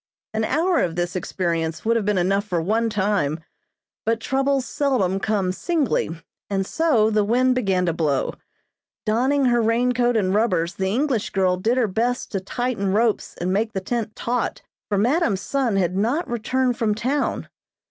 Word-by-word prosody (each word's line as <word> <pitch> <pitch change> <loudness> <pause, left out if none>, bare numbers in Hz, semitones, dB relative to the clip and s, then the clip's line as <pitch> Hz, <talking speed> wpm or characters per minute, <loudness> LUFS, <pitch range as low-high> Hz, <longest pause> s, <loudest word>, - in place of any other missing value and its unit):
An 220 0 0
hour 330 +8 +2
of 170 -2 0
this 175 +1 -2
experience 170 -2 -2
would 230 +1 +3
have 225 -3 0
been 210 -2 +1
enough 195 +3 +2
for 180 -5 -1
one 220 +7 +1
time, 195 -7 0 0.6
but 225 0 0
troubles 270 +1 0
seldom 240 -12 0
come 195 -3 0
singly, 300 - 0 0.4
and 195 -1 0
so 240 - +2
the 210 -1 +2
wind 250 +4 +3
began 195 -7 +1
to 170 - +1
blow. 150 -5 0 0.7
Donning 260 +6 +2
her 240 -1 +3
rain 230 +3 +2
coat 245 -1 +2
and 190 -3 +1
rubbers 190 -5 +1
the 190 - -2
English 245 +2 0
girl 185 -2 +2
did 225 +7 0
her 250 - +3
best 235 +5 -1
to 195 - -1
tighten 205 0 -2
ropes 220 +2 +1
and 180 +2 -1
make 220 +3 0
the 190 - -1
tent 220 +2 -3
taut, 245 0 -2 0.3
for 205 - +1
madam's 235 - +2
son 265 -6 0
had 185 -2 +1
not 240 - 0
returned 245 +1 0
from 215 -2 +1
town. 260 +7 -1
220 Hz, 175 wpm, -23 LUFS, 190-250 Hz, 0.7 s, would